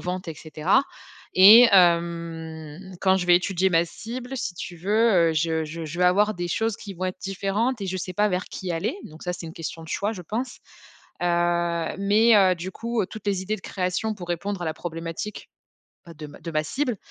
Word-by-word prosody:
ventes, 180 0 -4
et 160 - -5
cetera. 155 - +1 0.5
Et, 220 +6 +9
hem, 170 -1 +1
quand 190 -1 +4
je 180 - -3
vais 175 - +7
étudier 185 +1 +1
ma 165 0 +3
cible, 250 +8 -7
si 180 - -3
tu 175 0 -7
veux, 200 -1 +3
heu, - - -1
je 160 0 0
je 160 +1 -6
je 155 +3 -7
vais 180 - +4
avoir 205 +4 +3
des 175 0 -4
choses 225 +5 0
qui 200 -2 -9
vont 185 +1 -4
être 185 - -5
différentes 200 +5 -1
et - - -3
je 185 0 -3
sais 185 +1 -5
pas 210 +3 +2
vers 180 0 -2
qui 185 -2 -5
aller. 200 - -2
Donc 155 +1 -12
ça, 180 - -2
c'est 175 - -8
une 160 - -8
question 165 0 -6
de - - -13
choix, 205 +6 -1
je 185 - -8
pense. 240 +8 -4 0.6
Heu, 175 - +1 0.7
mais, 215 +3 +4
heu, 190 -2 +5
du 180 +3 -6
coup, 235 +2 -2
heu, 185 - -3
toutes 220 - -10
les 195 -2 0
idées 210 +3 -2
de - - -14
création 185 +4 -2
pour 180 -4 -9
répondre 190 +3 -3
à - - -2
la 155 - -2
problématique 165 +4 -6 0.6
bah 170 - -11
de 150 - -8
ma 145 - -13
de 170 - -7
ma 155 0 0
cible, 250 - -2
185 Hz, 225 wpm, -24 LUFS, 170-205 Hz, 0.7 s, Et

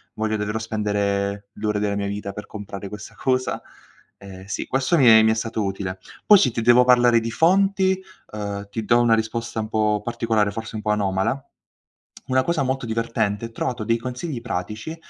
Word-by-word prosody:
Voglio 110 0 -1
davvero 105 +1 -2
spendere 100 -2 -1
l'ore 105 0 -2
della 105 -1 -1
mia 100 0 -2
vita 100 0 -5
per 105 +1 -7
comprare 100 -1 -8
questa 105 0 -9
cosa?" 130 -1 0 0.6
Ehm 95 -1 -11
sì, 100 - -4
questo 135 +6 +1
mi 135 - +4
è 110 -1 +9
mi 110 - +4
è - - +3
stato 110 -1 -2
utile. 95 -1 -3 0.3
Poi 210 - +8
se 130 - +3
ti 115 0 -2
devo 120 +2 +6
parlare 120 -1 +5
di 115 +1 -4
fonti, 190 - +3 0.3
uhm, 100 -1 -5
ti 110 +2 -4
do 120 +2 +4
una 115 -1 +4
risposta 115 +1 -3
un 110 - -6
po' 105 -1 +1
particolare, 115 -3 0
forse 115 +2 -7
un 110 - -4
po' 105 - +1
anomala. 105 +5 0 0.8
Una 130 0 +2
cosa 170 -3 0
molto 130 -1 -2
divertente, 115 -1 -1
trovato 120 0 -3
dei 115 +2 +1
consigli 125 +3 -5
pratici, 110 - -5
110 Hz, 185 wpm, -23 LUFS, 105-120 Hz, 0.8 s, è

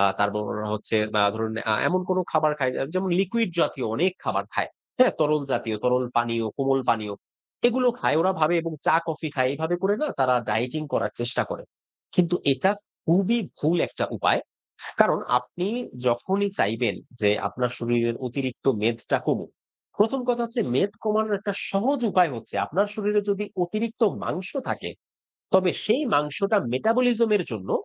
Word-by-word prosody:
আ - - +5 0.2
তারপর 105 +1 +1
ওরা 105 0 -4
হচ্ছে 110 +1 -1 0.3
আ - - +5
ধরুন, 110 0 -2 0.2
আ - - +4
এমন 185 +1 +1
কোনো 185 - +2
খাবার 155 -1 +3
খায় 130 -2 +1
এ - - +1
যেমন 185 0 0
লিকুইড 210 +2 0
জাতীয় 130 - 0
অনেক 180 +6 +2
খাবার - - 0
খায়, - - 0 0.3
হ্যাঁ? 255 0 +6
তরলজাতীয়, 140 -7 0
তরল 125 0 +3
পানীয়, 115 -1 +1
কোমল 135 0 +2
পানীয় 105 -3 -1 0.5
এগুলো 250 +1 +2
খায়। - - +2
ওরা 185 +3 +3
ভাবে 155 +3 +4
এবং 165 -1 -4
চা 160 - +6
কফি 160 -1 -3
খায়। 130 -1 +2
এভাবে 160 +4 -1
করে 195 +1 +3
না - - +2
তারা 130 -2 +4
dieting 125 +7 -1
করার - - 0
চেষ্টা 120 +1 +1
করে। - - -5 0.5
কিন্তু 175 -1 +3 0.2
এটা 190 +9 +2 0.4
খুবই 195 +8 +3 0.2
ভুল 160 +4 +2
১ - - -16
টা - - +2
উপায়। - - +2 0.6
কারণ - - +5 0.2
আপনি 175 +9 -5 0.4
যখনই 190 +12 +1
চাইবেন 110 +1 +1 0.3
যে 105 -1 +4 0.2
আপনার 125 -1 -2
শরীরের 120 0 0
অতিরিক্ত 130 +1 -5 0.2
মেদটা 115 +1 0
কমুক, - - -1 0.5
১ম 225 +6 +3
কথা 240 -1 +2
হচ্ছে 235 0 -1
মেদ 195 +10 +2
কমানোর 215 -1 +1
একটা 200 0 -3 0.2
সহজ 250 +8 +1
উপায় 180 -5 +4
হচ্ছে, 115 -1 -9
আপনার 195 +6 +1
শরীরে 210 0 +1
যদি 200 +1 -1 0.2
অতিরিক্ত 220 +6 -3 0.2
মাংস 185 +3 -3 0.2
থাকে, - - -4 0.6
তবে 185 -1 +5
সেই 240 +8 +2
মাংসটা 150 +9 +1 0.2
metabolism 230 - +2
এর 185 - -1
জন্য 95 -4 -6
160 Hz, 170 wpm, -25 LUFS, 125-205 Hz, 0.6 s, হ্যাঁ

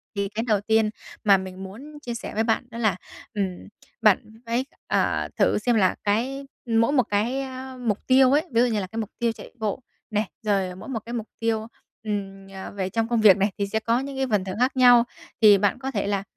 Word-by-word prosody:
Thì 200 -1 -1
cái 220 +3 -3
đầu 210 -3 +2
tiên 220 0 +2 0.3
mà 200 -2 +6
mình 185 0 -7
muốn 265 +11 -10
chia 240 -4 -5
sẻ 235 - -6
với 220 +2 +1
bạn 225 -1 +1
đó - - -7
là, 215 -6 +2 0.4
ừm, 190 -4 -3 0.3
bạn 215 -3 +6 0.3
phải, 235 +3 0 0.2
ờ, - - +1
thử - - +3
xem 235 +3 +1
là 190 -4 +3
cái 250 +7 0 0.2
mỗi 230 +1 +2
một 270 -4 +4
cái, 225 +6 0
a, 260 -1 -7
mục 225 -5 -2
tiêu 260 0 +6
ấy, 290 - +4
ví 235 0 +3
dụ 250 - +4
như 220 -3 0
là 190 - -4
cái 220 - -9
mục 215 - -3
tiêu 235 -1 +2
chạy - - -11
bộ 215 +3 -2 0.3
này, 215 -1 0 0.2
rồi 195 -3 0
mỗi 190 +7 -10
một 235 -4 -2
cái 235 - -6
mục 225 -2 -3
tiêu, 225 -1 -1 0.4
ừm, 195 -2 -4
à, 190 0 -7
về 190 -2 -3
trong 225 +2 0
công 235 -1 +1
việc 200 -3 +8
này 200 +1 +1
thì 200 -1 -1
sẽ 220 +2 -1
có 230 +2 +1
những 270 0 -5
cái 265 - 0
phần 200 -3 +2
thưởng 190 +1 -5
khác 255 +2 +1
nhau. 245 -2 +7 0.4
Thì 210 -2 +8
bạn 200 +4 +1
có 265 0 -4
thể 200 -5 -1
là, 200 -1 0
220 Hz, 240 wpm, -24 LUFS, 200-245 Hz, 0.4 s, việc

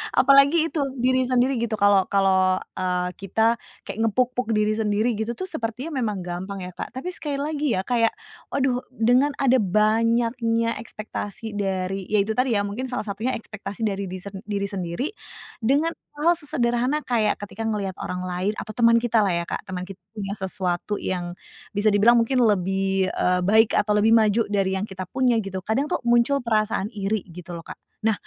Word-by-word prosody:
Apalagi 280 +5 +5
itu 320 - -2 0.2
diri 255 0 +2
sendiri 255 0 +2
gitu, 230 -1 -1
kalau 200 -2 +4
kalau, 190 -1 +3 0.2
eee, 180 -1 0
kita 220 +4 +1 0.2
kayak 215 - -7
nge-puk-puk 250 0 0
diri 215 +1 +1
sendiri 215 +2 +1
gitu 220 +2 -3
tuh, - - -5
sepertinya 265 -3 -4
memang 210 -6 -2
gampang 185 +2 -5
ya 180 - -6
Kak. 180 - -8
Tapi 355 +8 -4
sekali 295 -5 -4
lagi 295 -1 -1
ya 185 - -1
kayak, 230 0 +1 0.3
waduh, 260 -2 0 0.2
dengan 250 +5 +3
ada 260 -1 +3
banyaknya 230 +3 +2
ekspektasi 215 0 -6
dari, 195 -1 -2
ya 210 -2 +3
itu 220 - -3
tadi 250 +1 +1
ya, 200 - +2
mungkin 210 +6 -4
salah 250 -2 -3
satunya 220 +5 -2
ekspektasi 215 -1 -7
dari 200 -2 -1
diri 185 0 -6
sen 200 -1 -7
diri 200 -1 -1
sendiri, 185 - -3 0.5
dengan 280 +8 +2 0.2
hal-hal 335 +4 +3
sesederhana 250 0 0
kayak 225 -4 +1
ketika 205 +2 -6
ngelihat 200 -4 -2
orang 180 0 -4
lain 180 +3 -1
atau 215 - -6
teman 230 -1 +5
kita 235 -1 +2
lah 195 - +1
ya 170 - -1
Kak, - - -5
teman 185 -1 -4
kita 190 0 -10 0.2
punya 200 -2 -4
sesuatu 190 0 -2
yang 175 -1 -3 0.4
bisa 205 +1 +2
dibilang 215 +4 +6
mungkin 235 +3 +2
lebih, 195 -2 +1
eee, 180 0 +1
baik 220 +1 +5
atau 210 - +2
lebih 220 +2 +4
maju 220 0 +3
dari 195 -2 0
yang 195 - -2
kita 190 -1 -6
punya 255 -2 +2
gitu, 190 -1 -4
kadang 265 +7 0
tuh - - +1
muncul 240 +4 +4
perasaan 215 -3 0
iri, 205 0 -2
gitu 175 0 -10
loh 165 - -9
Kak. - - -8 0.3
Nah, 220 - +4
215 Hz, 185 wpm, -24 LUFS, 195-245 Hz, 0.5 s, dibilang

